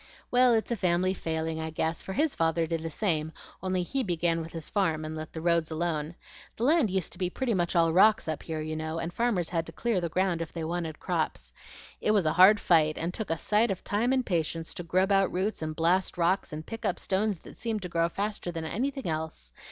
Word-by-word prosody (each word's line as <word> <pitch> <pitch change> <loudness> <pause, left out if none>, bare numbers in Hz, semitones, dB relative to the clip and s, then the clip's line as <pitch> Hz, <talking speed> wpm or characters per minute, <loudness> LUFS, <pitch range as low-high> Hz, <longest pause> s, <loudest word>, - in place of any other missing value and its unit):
"Well, 250 -1 +5
it's 220 +2 -1
a - - +2
family 185 -1 +1
failing 160 -2 -3
I 160 - -3
guess, 160 +1 -1
for 190 - -6
his 300 +6 +1
father 165 0 +1
did 165 0 -2
the 165 - -4
same, 160 -3 -1 0.3
only 185 -1 0
HE 270 +9 -1
began 170 -5 0
with 165 0 -7
his 165 -2 -6
farm 165 -6 0
and 155 0 -5
let 155 0 -6
the 160 - -6
roads 170 -1 +2
alone. 160 -1 -2 0.4
The 225 - -3
land 295 -3 +4
used 190 -3 -1
to - - -10
be 180 -2 0
pretty 245 +4 -1
much 175 -2 0
all 165 -1 +4
rocks 210 +3 +5
up 155 -2 -2
here, 160 -2 -4
you 155 0 -4
know, 160 +1 -3
and 165 +1 -4
farmers 210 -8 0
had 165 -2 -1
to - - -7
clear 220 +2 -1
the 170 - -2
ground 180 0 0
if 165 - -5
they 165 - -5
wanted 165 -1 -3
crops. - - -2 0.5
It 215 - +2
was 195 -5 +3
a 155 - +2
hard 190 +4 +7
fight, 155 -3 +3
and 170 +2 -2
took 220 -1 -4
a 165 - 0
sight 215 +7 +2
of 190 -2 -3
time 225 +5 +1
and 260 -2 +2
patience 165 -2 -1
to - - -5
grub 185 +3 +1
out 195 -1 +3
roots 190 +2 -1
and 155 0 -3
blast 175 +4 +1
rocks 180 +3 +1
and 155 +1 -6
pick 225 0 -7
up - - 0
stones 200 +1 0
that - - -14
seemed 220 -3 -2
to - - -3
grow 170 0 +1
faster 200 -1 -3
than 165 -1 -5
anything 270 - -2
else. 155 - -4
175 Hz, 245 wpm, -28 LUFS, 160-200 Hz, 0.5 s, hard